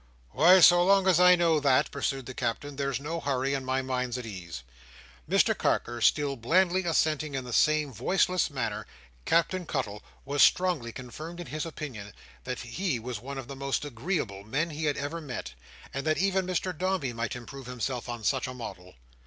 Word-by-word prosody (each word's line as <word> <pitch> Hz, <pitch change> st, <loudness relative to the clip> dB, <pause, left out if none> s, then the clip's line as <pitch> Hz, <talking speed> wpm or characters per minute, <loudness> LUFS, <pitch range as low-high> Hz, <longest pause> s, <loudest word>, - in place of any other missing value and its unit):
"Why, 180 Hz, +4 st, +6 dB
so 175 Hz, +1 st, +8 dB
long 195 Hz, +1 st, +4 dB
as 180 Hz, -3 st, +5 dB
I 180 Hz, 0 st, +8 dB
know 165 Hz, -3 st, +3 dB
that," 140 Hz, -3 st, +3 dB
pursued 135 Hz, -2 st, -2 dB
the 130 Hz, -, -7 dB
Captain, 130 Hz, +4 st, -3 dB
"there's 140 Hz, -2 st, -1 dB
no 160 Hz, +4 st, -4 dB
hurry, 135 Hz, -2 st, -1 dB
and 135 Hz, -1 st, -2 dB
my 130 Hz, 0 st, -1 dB
mind's 125 Hz, -1 st, -2 dB
at 125 Hz, -, -6 dB
ease. 85 Hz, -, -7 dB, 0.7 s
Mr -, -, +4 dB
Carker 120 Hz, 0 st, -1 dB
still 145 Hz, +4 st, +3 dB
blandly 180 Hz, +9 st, +2 dB
assenting 155 Hz, -3 st, +1 dB
in 130 Hz, -, -2 dB
the 125 Hz, -, -6 dB
same 155 Hz, -1 st, +3 dB
voiceless 180 Hz, -, +1 dB
manner, 115 Hz, -6 st, -3 dB, 0.4 s
Captain 180 Hz, +2 st, +2 dB
Cuttle 105 Hz, -7 st, -3 dB, 0.2 s
was 140 Hz, +1 st, 0 dB
strongly 175 Hz, -11 st, +3 dB
confirmed 155 Hz, +9 st, -8 dB
in 175 Hz, -, -6 dB
his 155 Hz, +1 st, -4 dB
opinion 125 Hz, -11 st, -7 dB, 0.3 s
that 125 Hz, -1 st, -4 dB
he 140 Hz, +5 st, -2 dB
was 120 Hz, -1 st, -5 dB
one 140 Hz, +2 st, -7 dB
of 135 Hz, -3 st, -6 dB
the 140 Hz, -, -7 dB
most 140 Hz, +2 st, -2 dB
agreeable 120 Hz, -, -3 dB
men 150 Hz, +10 st, -1 dB
he 155 Hz, +1 st, -3 dB
had 145 Hz, -1 st, 0 dB
ever 145 Hz, +4 st, -4 dB
met, 125 Hz, -, -6 dB, 0.4 s
and 135 Hz, -, -3 dB
that 155 Hz, -, +2 dB
even 190 Hz, -1 st, +1 dB
Mr 185 Hz, 0 st, -1 dB
Dombey 185 Hz, -7 st, -1 dB
might 115 Hz, +2 st, -3 dB
improve 125 Hz, +2 st, -9 dB
himself 125 Hz, 0 st, -4 dB
on 120 Hz, -2 st, -5 dB
such 130 Hz, +2 st, +1 dB
a 130 Hz, -, -7 dB
model. 90 Hz, -7 st, -9 dB
140 Hz, 190 wpm, -28 LUFS, 125-165 Hz, 0.7 s, so